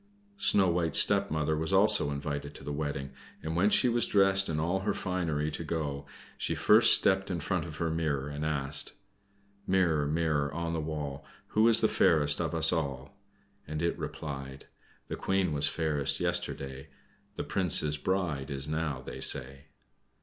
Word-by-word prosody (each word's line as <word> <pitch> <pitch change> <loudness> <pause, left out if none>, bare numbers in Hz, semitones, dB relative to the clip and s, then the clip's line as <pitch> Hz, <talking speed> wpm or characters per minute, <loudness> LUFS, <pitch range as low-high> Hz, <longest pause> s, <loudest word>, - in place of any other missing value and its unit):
Snow 100 - +4
White's 85 -2 +1
stepmother 80 -7 +3
was 80 +3 -3
also 100 -4 +4
invited 70 0 -5
to - - -11
the 75 - -5
wedding, 70 -2 -4 0.3
and 80 +1 -3
when 95 +4 +3
she 125 - +3
was 120 -1 +1
dressed 95 -1 +3
in 75 -1 -1
all 85 +4 0
her 95 - -2
finery 80 -5 -2
to 85 - -5
go, 75 -3 -4 0.3
she - - -2
first 110 +2 +6
stepped 95 -1 +1
in 90 -3 -2
front 75 - -2
of - - -8
her 85 -1 -2
mirror 75 -4 -2
and 75 +1 -5
asked: 75 -2 -2 0.7
"Mirror, 85 -6 +2
mirror 75 -2 0
on 85 0 -3
the 80 - -2
wall, 75 -3 -5 0.3
Who 110 +2 +3
is 115 - +6
the - - +4
fairest 75 -2 +2
of - - -2
us 80 +1 +4
all?" 70 0 -4 0.5
and 75 +1 -4
it 85 - 0
replied: 70 -3 -7 0.4
"The - - -4
Queen 95 -4 0
was 75 0 +1
fairest 75 -4 -1
yesterday; 65 0 -3 0.5
The - - -4
Prince's 75 -6 +1
bride 85 -6 -2
is 70 0 -4
now, 75 -4 -3
they - - -8
say." 70 +3 0
80 Hz, 170 wpm, -29 LUFS, 70-90 Hz, 0.7 s, first